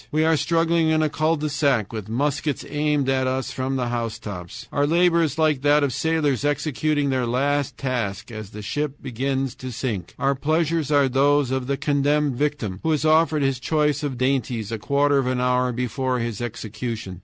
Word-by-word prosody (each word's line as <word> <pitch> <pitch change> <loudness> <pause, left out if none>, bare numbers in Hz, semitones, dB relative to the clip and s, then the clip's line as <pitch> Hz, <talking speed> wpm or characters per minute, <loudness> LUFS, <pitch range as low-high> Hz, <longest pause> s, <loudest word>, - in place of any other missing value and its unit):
We 155 +1 +2
are 160 0 +4
struggling 165 +1 +2
in 155 0 +3
a 155 - +1
CUL 155 +2 +1
DE 150 -1 -2
SAC 135 -8 +1
with 110 -2 -6
muskets 145 +4 -1
aimed 150 -1 0
at 130 -1 +1
us 130 0 -2
from 130 0 -2
the 125 -2 -1
housetops. 115 -3 -5
Our 145 0 +2
labor 170 +1 +4
is 160 -2 -1
like 155 -4 +2
that 145 +1 +4
of 140 -3 0
sailors 155 -5 0
executing 145 0 0
their 130 -2 0
last 140 +3 0
task 120 -5 -3
as 110 -3 -7
the 105 0 -9
ship 145 +5 -2
begins 135 +1 -2
to 130 0 -6
sink. 115 -8 -4
Our 140 +1 +2
pleasures 155 +2 0
are 145 -2 +4
those 140 +1 +2
of 130 -1 -1
the 140 0 0
condemned 145 -1 +1
victim, 130 -9 -2
who 160 - 0
is 150 0 0
offered 155 -1 +3
his 135 -2 0
choice 150 0 +1
of 140 -4 -3
dainties 125 -4 -1
a 115 - -3
quarter 140 +5 +2
of 130 - -1
an 130 -1 0
hour 125 0 +2
before 125 +1 -1
his 115 -3 -3
execution. 110 -4 -5
135 Hz, 195 wpm, -23 LUFS, 125-150 Hz, -, are